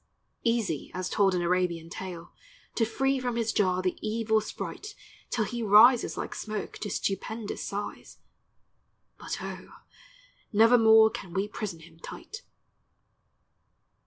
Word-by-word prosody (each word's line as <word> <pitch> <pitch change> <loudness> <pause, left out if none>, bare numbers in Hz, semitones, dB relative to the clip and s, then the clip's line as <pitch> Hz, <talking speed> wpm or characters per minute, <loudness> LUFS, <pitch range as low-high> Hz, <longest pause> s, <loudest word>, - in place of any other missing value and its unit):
Easy 230 - 0
as 185 0 -3
told 195 -3 +3
in 175 - 0
Arabian 175 -2 0
tale, 175 -1 -8 0.4
To 225 - +1
free 270 +4 0
from 245 -2 -2
his 230 -1 0
jar 185 -2 +1
the 185 - -1
evil 220 0 +1
sprite 415 - -7 0.3
Till 220 -3 0
he 235 +3 -4
rises 225 +4 +6
like - - -4
smoke 215 -2 -5
to 205 - -4
stupendous 205 +3 -3
size, 205 0 -6 1.0
But - - -5
O, - - -7 0.8
nevermore 220 0 +6
can 175 -5 -8
we 195 +2 0
prison 205 -6 -6
him 165 0 -16
tight. 375 - -9
215 Hz, 130 wpm, -28 LUFS, 185-230 Hz, 1.0 s, rises